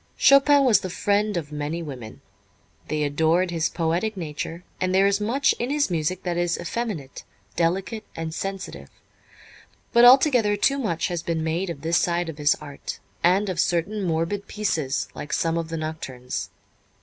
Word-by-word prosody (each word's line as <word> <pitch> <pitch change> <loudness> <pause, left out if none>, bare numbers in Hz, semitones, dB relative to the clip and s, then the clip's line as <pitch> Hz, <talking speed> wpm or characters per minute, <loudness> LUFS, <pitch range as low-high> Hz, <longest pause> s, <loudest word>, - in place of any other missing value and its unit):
Chopin 275 +1 +6
was 235 -5 +5
the 185 - -5
friend 205 +2 0
of 150 -3 -5
many 150 +3 -3
women. 130 -5 -8 0.7
They 155 0 -1
adored 160 +5 +2
his 165 -1 0
poetic 175 +6 -1
nature, 165 +1 -5 0.2
and 185 0 0
there 195 +1 +5
is 200 +1 +2
much 255 +7 +2
in 240 - -1
his 290 -7 +1
music 170 +2 -1
that 175 -1 -2
is 175 -1 0
effeminate, 175 - -4 0.3
delicate 190 +6 -1
and 160 -1 -4
sensitive; 180 - -5 1.0
but 235 - +6
altogether 245 -5 +6
too 275 +6 +2
much 175 -11 -1
has 175 -2 -2
been 165 -1 -2
made 170 +4 -1
of 155 -5 -6
this 165 +2 +1
side 175 -1 0
of 155 -2 -8
his 145 0 +3
art, 145 -2 -8 0.3
and 190 +4 +3
of 185 -3 -3
certain 180 +6 0
morbid 170 +3 -1
pieces 160 -10 -1
like 150 - -7
some 165 0 +1
of 165 -1 -2
the 165 - -3
Nocturnes. 135 -6 -5
170 Hz, 170 wpm, -24 LUFS, 160-205 Hz, 1.0 s, Chopin